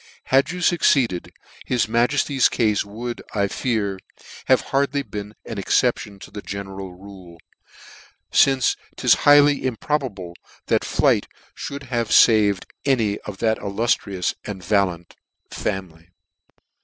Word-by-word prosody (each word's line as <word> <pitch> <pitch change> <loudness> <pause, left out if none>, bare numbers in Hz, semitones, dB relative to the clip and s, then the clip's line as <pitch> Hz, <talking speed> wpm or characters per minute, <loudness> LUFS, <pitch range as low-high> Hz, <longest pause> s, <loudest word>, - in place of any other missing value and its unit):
Had 135 +2 +4
you 180 +1 -5
fucceeded, 135 - +2 0.3
his 125 -3 0
majefty's 125 +4 +2
cafe 105 -3 +1
would, 120 +3 -6
I 100 -1 +2
fear, 100 -4 -2 0.5
have 130 -1 +4
hardly 140 +1 +1
been 105 -2 -7
an 110 - -5
exception 105 0 0
to - - -11
that 105 0 -8
general 95 -2 -6
rule, 95 -3 -13 0.9
fince 135 -2 +4 0.2
'tis - - +4 0.2
highly 145 0 +6
improbable 125 - -3 0.3
that - - +1
flight - - +2 0.4
mould 140 0 -7
have 120 -4 -2
faved 105 -5 +5 0.2
any 115 -7 +1
of 105 -2 -7
that 110 +1 0
illuftrious 100 -2 -1
and 95 -3 -7
valiant 90 -3 0 0.4
family. 85 -3 -5
110 Hz, 120 wpm, -22 LUFS, 100-130 Hz, 0.9 s, highly